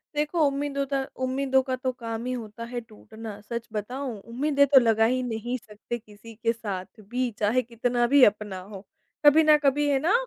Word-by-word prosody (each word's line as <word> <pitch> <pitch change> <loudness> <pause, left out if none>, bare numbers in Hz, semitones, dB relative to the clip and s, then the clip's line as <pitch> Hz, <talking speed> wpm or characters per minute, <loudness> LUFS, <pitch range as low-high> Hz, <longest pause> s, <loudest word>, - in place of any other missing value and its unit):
देखो, 300 +3 0
उम्मीदों 280 0 -1
दा 275 -1 +1 0.2
उम्मीदों 265 0 +2
का 260 -1 -2
तो 255 0 -2
काम 230 -2 -6
ही 255 - -2
होता 230 -2 -7
है 245 0 -3
टूटना, 220 -1 -10
सच 235 +2 -5
बताऊँ 245 +3 -4
उम्मीदें 280 +3 +2
तो 270 -1 +7
लगा 225 -2 +3
ही 255 +2 +1
नहीं 240 +1 -3
सकते, 215 +1 -7
किसी 215 0 -14
के 230 - +3
साथ 200 -5 -5 0.2
भी 250 0 0
चाहे 220 +5 +2
कितना 240 0 0
भी 280 -3 +8
अपना 205 -2 -1
हो, 200 -1 -10 0.4
कभी 305 +2 +7
ना 305 -1 +6
कभी 290 +2 +3
है 275 -1 +3
ना, 330 +8 +2
245 Hz, 195 wpm, -26 LUFS, 220-275 Hz, 0.4 s, भी